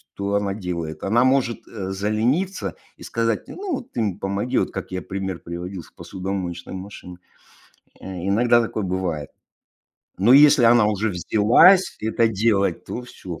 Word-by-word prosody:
то 100 0 -2
она 100 -1 0
делает. 85 -5 -5
Она 115 +5 +3
может, 130 -2 +1
э, 95 -4 -6
залениться 115 - -1 0.2
и - - -13
сказать: 115 -1 -2
"Ну, 370 -7 -4
ты 125 - -5
мне 100 -3 -2
помоги". 100 +5 -2
Вот - - 0
как - - -6
я 90 0 -3
пример 95 -2 -5
приводил 85 +1 -7
с - - -19
посудомоечной 90 -2 -6
машиной. 95 -2 -9 0.8
Э, - - -13 0.2
иногда 120 +4 +4
такое 110 -2 -3
бывает, 90 -6 -3 0.9
но 105 +6 +4
если 145 -2 +7
она 115 -2 +5
уже 105 +1 0
взялась 110 - +4
это 110 +1 +1
делать, 100 -4 0
то 125 - -6
всё, 90 -9 -9
100 Hz, 150 wpm, -22 LUFS, 95-120 Hz, 0.9 s, если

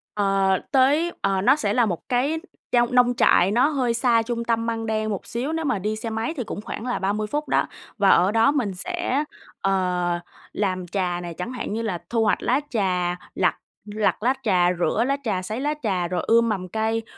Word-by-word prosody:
Ờ, 195 -2 +2
tới, 285 +6 +3
ờ, 195 -1 +1
nó 205 - +5
sẽ 210 -9 -1
là 245 0 +3
một 180 0 -4
cái 275 +6 +1 0.3
trong 240 0 +2
nông 245 0 +5
trại 190 -4 +4
nó 245 +6 +4
hơi 260 -6 0
xa 235 -1 +3
trung 235 +1 -3
tâm 230 -1 0
Măng 225 -1 -2
Đen 215 -1 -1
một 200 -3 -4
xíu, 255 +7 -3
nếu 325 0 -2
mà 220 -8 0
đi 210 +3 -2
xe 225 +1 -5
máy 225 +6 -2
thì 250 - -1
cũng 210 - -6
khoảng 215 - -6
là 250 - -1
30 205 +2 -1
phút 295 +7 -3
đó - - +2 0.3
và 200 -2 +4
ở 185 +2 +5
đó 225 +5 +4
mình 245 -10 -1
sẽ, 295 - -2 0.4
ờ, 180 -2 0 0.3
làm 185 -3 -2
trà 180 -1 -1
này, 175 -1 -6
chẳng 180 +8 -5
hạn 250 -4 -4
như 225 - -2
là 210 -6 -2
thu 230 -1 +1
hoạch 210 - +1
lá 255 +3 +2
trà, 180 -6 0 0.2
lặt 180 -3 +2 0.3
lặt 210 0 0
lá 255 +2 +3
trà, 180 -5 +3
rửa 215 +5 +1
lá 275 +1 +1
trà, 200 -6 -1
sấy 215 +6 -4
lá 295 +2 0
trà 185 -5 0
rồi 180 0 -2
ươm 230 0 +4
mầm 190 -4 -2
cây 220 +3 -1
220 Hz, 220 wpm, -23 LUFS, 190-245 Hz, 0.4 s, nó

